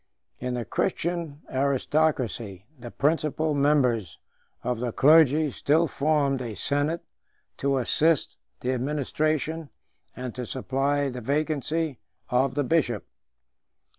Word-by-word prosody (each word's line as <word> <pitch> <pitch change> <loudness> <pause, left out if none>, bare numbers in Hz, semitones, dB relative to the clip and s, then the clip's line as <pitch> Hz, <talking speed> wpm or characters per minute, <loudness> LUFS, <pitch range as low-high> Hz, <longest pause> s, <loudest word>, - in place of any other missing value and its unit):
In 125 0 -2
the 120 -2 -3
Christian 170 -4 -2
aristocracy, 130 - 0
the 120 0 -8
principal 155 +2 0
members 125 - +2 0.5
of 125 -1 -1
the 120 0 -2
clergy 150 +2 +5
still 160 +6 +2
formed 140 -2 +1
a 115 -4 -5
senate 145 +7 0 0.5
to 140 0 +1
assist 150 +5 +2 0.2
the 125 - 0
administration, 150 +4 -1 0.5
and 125 -2 -5
to 125 -2 -5
supply 140 +3 0
the 125 -1 -6
vacancy, 150 +2 -1 0.3
of 130 +1 +2
the 145 - +1
bishop. 130 -7 +1
140 Hz, 110 wpm, -26 LUFS, 125-155 Hz, 0.5 s, clergy